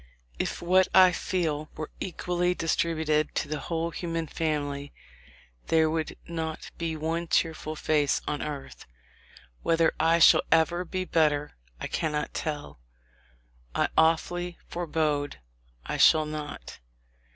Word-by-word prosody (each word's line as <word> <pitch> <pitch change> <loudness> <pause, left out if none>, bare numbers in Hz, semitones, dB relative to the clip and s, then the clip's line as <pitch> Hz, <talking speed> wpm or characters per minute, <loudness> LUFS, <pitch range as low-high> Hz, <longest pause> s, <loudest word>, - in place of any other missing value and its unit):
If - - -2
what 185 +2 +4
I 185 -1 +8
feel 165 -4 -2
were 155 -1 -5
equally 180 0 -1
distributed 160 -2 0
to - - -1
the 150 0 -3
whole 165 +2 -2
human 165 0 -3
family, 145 -3 -3 0.7
there 160 -1 +3
would 160 -1 -2
not 160 -2 -5
be 165 -2 -2
one 165 +2 -2
cheerful 160 -1 0
face 150 -2 +1
on 145 - -2
earth. 145 -2 -7 0.7
Whether 165 -1 +3
I 165 +1 +4
shall 165 - +7
ever 170 +2 +3
be 185 +1 -3
better, 150 -4 +2 0.3
I - - -4
cannot 150 -2 -2
tell; 150 - -4 1.0
I - - +2
awfully 175 +2 +2
forebode 150 - -1 0.5
I - - -3
shall 155 -1 +6
not. 150 -1 -7
160 Hz, 125 wpm, -27 LUFS, 150-170 Hz, 1.0 s, I